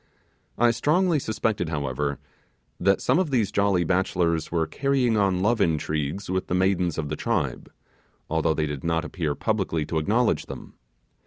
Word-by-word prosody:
I 120 0 +4
strongly 160 +6 +2
suspected 110 -7 -1
however, 70 -1 -2 0.6
that 100 +2 +2
some - - +3
of 185 -4 0
these 115 -7 +1
jolly 100 -3 +2
bachelors 85 -2 0
were 85 -2 +1
carrying 130 - +1
on 95 -3 +1
love 115 +1 +2
intrigues 80 +1 -1
with 95 0 -2
the 90 - -1
maidens 90 -2 +1
of 75 -3 -3
the 80 - -2
tribe; - - -2 0.6
although 80 0 +1
they 75 - 0
did 75 -2 -5
not 85 0 0
appear 80 -5 -2
publicly 95 -8 -1
to 80 +1 -1
acknowledge 110 +9 +1
them. - - -9
90 Hz, 160 wpm, -25 LUFS, 80-110 Hz, 0.6 s, I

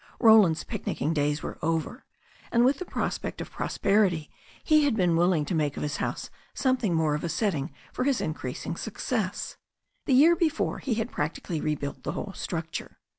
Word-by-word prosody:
Roland's 215 -8 +6
picnicking 155 +3 -2
days 150 0 0
were - - -6
over, 165 - -2 0.5
and 235 +1 +4
with 270 +3 +3
the 365 - -4
pros - - -2
pect - - -6
of - - -6
prosperity 195 -7 +1 0.3
he 310 -1 +5
had 280 -5 +2
been 180 -5 +2
willing 170 -2 +3
to 160 - -3
make 150 -3 0
of - - -3
his 150 0 -2
house - - -3 0.2
something 255 -9 +1
more 160 -2 +2
of 150 - -2
a 170 - -1
setting 170 -4 -1 0.2
for - - -1
his 270 -2 +2
increasing 155 0 -4
success. 215 0 -3 0.5
The 265 - +4
year 320 +6 +7
before 320 -2 0
he 250 -5 -1
had 225 +2 -2
practically 150 +1 -3
rebuilt 140 -3 -3
the 140 +4 -3
whole 195 +2 -5
structure. 165 -3 -5
175 Hz, 180 wpm, -27 LUFS, 155-235 Hz, 0.5 s, year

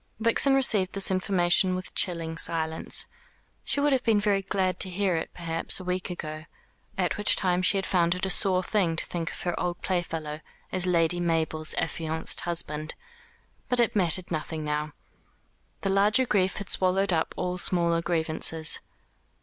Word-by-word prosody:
Vixen 230 +4 +3
received 210 -8 +3
this 195 -1 +2
information 185 -1 +3
with 185 0 -7
chilling 165 -3 0
silence. 160 -1 -1 0.6
She - - -1
would 290 0 +2
have 260 - +1
been 220 -3 +2
very 205 -1 +1
glad 185 -1 -1
to 190 - +2
hear 185 0 -1
it, 160 - -3
perhaps, 165 0 -1
a - - -8
week 180 0 -3
ago 155 -3 -6 0.5
at 180 -2 -1
which 210 - +6
time 180 -2 0
she 190 +2 +2
had 195 - -2
found 175 -2 +1
it 180 - -2
a - - -2
sore 185 -1 +2
thing 185 -5 0
to - - 0
think 170 -1 -4
of - - -8
her 175 -1 -2
old 175 0 -3
playfellow 165 -4 -3 0.3
as 185 -1 +1
Lady 175 -1 +2
Mabel's 160 -2 0
affianced 160 -1 -1
husband 155 -3 -2 0.7
but 250 - +2
it 235 -2 +2
mattered 180 -2 +3
nothing 155 0 -4
now. 150 0 -3 0.9
The 195 - -1
larger 210 +6 +3
grief 190 -5 0
had 200 - -6
swallowed 190 +1 +1
up 160 -1 -1
all 180 0 -3
smaller 170 -2 +2
grievances. 160 -1 -1
180 Hz, 170 wpm, -26 LUFS, 165-195 Hz, 0.9 s, which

